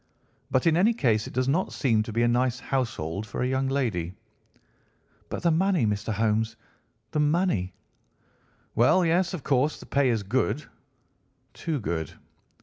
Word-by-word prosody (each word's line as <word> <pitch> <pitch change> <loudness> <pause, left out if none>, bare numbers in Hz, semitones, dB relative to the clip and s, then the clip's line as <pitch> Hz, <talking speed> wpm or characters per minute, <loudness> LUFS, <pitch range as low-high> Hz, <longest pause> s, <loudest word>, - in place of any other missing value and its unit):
But 130 - +1
in 165 -1 +4
any 220 +6 +4
case 110 - +1
it - - -9
does 130 0 +1
not 165 +8 +1
seem 115 -6 +1
to 110 - -5
be 115 +2 +1
a - - +4
nice 125 +1 +1
household 110 - -2
for 100 - -3
a - - +1
young 130 +1 0
lady." 100 -11 -1 1.1
"But - - -5
the 170 - +4
money, 180 - +2
Mr. 105 +1 -1
Holmes, 110 +1 0 0.6
the 150 - 0
money!" 150 - +1 1.0
"Well, 150 +11 +4
yes, 180 +3 +2
of 155 - -8
course 140 +2 +1
the - - -11
pay 140 -2 +2
is 110 -4 0
good—too 130 - -5
good. 80 -4 -3
125 Hz, 155 wpm, -26 LUFS, 110-150 Hz, 1.1 s, in